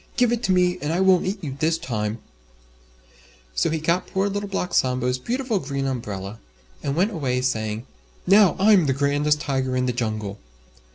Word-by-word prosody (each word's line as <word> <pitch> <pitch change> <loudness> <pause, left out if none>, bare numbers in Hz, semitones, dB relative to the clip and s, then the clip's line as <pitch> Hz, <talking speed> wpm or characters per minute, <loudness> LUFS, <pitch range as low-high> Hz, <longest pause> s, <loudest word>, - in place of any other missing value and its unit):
"Give 245 -2 +3
it 240 -1 0
to - - +1
me 180 0 +2
and 150 - -2
I 170 - 0
won't 190 -1 +4
eat 195 0 -3
you 135 -4 -4
this 160 +1 +2
time." 110 -5 -3 1.4
So - - +1
he 160 - 0
got 170 +3 0
poor 195 +1 0
Little 205 0 -3
Black 180 -2 -3
Sambo's 125 0 +1
beautiful 240 - -1
Green 140 -3 -3
Umbrella, 105 -5 -4 0.4
and 140 - -2
went 190 +7 +2
away 130 - -1
saying, 110 -2 -2 0.4
"Now 195 0 +6
I'm 195 -4 +5
the 135 - +2
grandest 145 +2 +1
Tiger 130 -2 -1
in 125 - +1
the 125 - 0
Jungle." 110 -4 -3
145 Hz, 180 wpm, -23 LUFS, 125-185 Hz, 1.4 s, Now